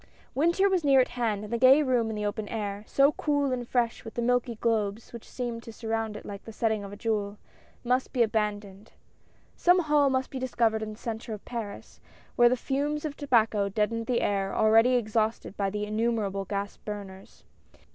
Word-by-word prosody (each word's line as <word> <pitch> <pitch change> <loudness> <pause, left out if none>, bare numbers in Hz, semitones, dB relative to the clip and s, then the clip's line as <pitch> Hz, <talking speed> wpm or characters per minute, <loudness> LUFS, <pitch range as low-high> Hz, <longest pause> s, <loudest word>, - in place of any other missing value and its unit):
Winter 340 +7 +3
was 375 -4 +1
near 275 -2 +5
at 255 - +3
hand, 225 -4 -2
and 210 +2 -7
the 235 - 0
gay 265 +4 +7
room 245 -4 +1
in 220 - -4
the 210 0 -3
open 205 +1 -3
air 205 -2 -4
— - - -30
so 280 +1 +4
cool 285 -3 0
and 245 -2 -3
fresh 235 -2 0
with 225 - -9
the 240 - -1
milky 245 -1 +1
globes 220 -1 -1
which 235 - -10
seemed 240 -2 -4
to 230 - -10
surround 225 -1 -3
it - - -11
like 200 -1 -8
the 225 - -9
setting 220 -1 -1
of 200 - -8
a - - -7
jewel 210 -1 -2 0.2
— - - -31
must 255 +1 0
be 245 -3 +3
abandoned. 210 -2 -3 0.6
Some 355 +1 +4
hall 295 -3 +3
must 260 0 -1
be 265 - -4
discovered 230 -4 +1
in 215 0 -4
the - - -13
centre 225 -1 -5
of 205 - -14
Paris, 225 -4 -7 0.3
where 240 0 +6
the 255 - +1
fumes 290 +4 -2
of 295 -2 -4
tobacco 225 -8 +2
deadened 225 +2 -1
the 245 -2 +1
air 195 -1 -1
already 225 +3 +5
exhausted 220 -3 -1
by 200 -1 0
the 210 +1 -3
innumerable 215 -2 -1
gas 200 +1 -4
burners. 195 -2 -9
225 Hz, 205 wpm, -28 LUFS, 210-255 Hz, 0.6 s, gay